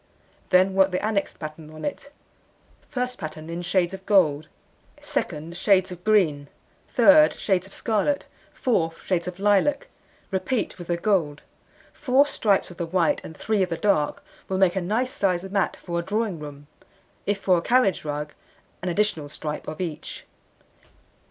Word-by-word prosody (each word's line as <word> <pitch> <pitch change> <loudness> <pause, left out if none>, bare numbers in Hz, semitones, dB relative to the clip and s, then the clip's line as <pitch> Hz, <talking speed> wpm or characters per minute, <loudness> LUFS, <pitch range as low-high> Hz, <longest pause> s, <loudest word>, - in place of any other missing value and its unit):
Then 185 +1 +4
work 190 0 +4
the 185 +2 -2
annexed 210 -2 -1
pattern 155 0 -8
on 155 0 -8
it. 285 0 -5 0.8
First 250 -2 -3
pattern 155 -1 -7
in 170 +1 -4
shades 175 0 +1
of 190 0 -8
gold; 155 -7 +3 0.5
second, 160 +3 -3
shades 190 0 +3
of 180 0 -9
green; 165 -10 +2 0.4
third, 295 +5 +6
shades 190 -2 0
of 195 - -13
scarlet; 230 +6 0 0.3
fourth, 165 - -1
shades 180 -2 -1
of 180 0 -5
lilac. 205 +8 +2 0.4
Repeat 190 +2 -1
with 175 - -8
the 175 - 0
gold. 170 -6 0 0.5
Four 275 0 +3
stripes 205 -10 +1
of 175 - -13
the 170 - -3
white, 170 -1 +1
and 160 - -10
3 215 -2 0
of 185 - +1
the 165 - -2
dark, 165 -5 +1 0.2
will 190 - 0
make 190 -1 +3
a 190 - 0
nice 225 +8 0
sized 190 -3 -1
mat 195 -1 0
for 170 -1 -3
a - - -3
drawing 210 -2 -1
room. 145 -1 -9 0.6
If 205 0 +1
for 185 -3 +3
a - - -5
carriage 240 -2 +2
rug, 150 0 -4 0.5
an 180 - -2
additional 170 -6 0
stripe 150 0 -6
of 155 - -6
each. 170 -5 -5
185 Hz, 165 wpm, -25 LUFS, 165-210 Hz, 0.8 s, third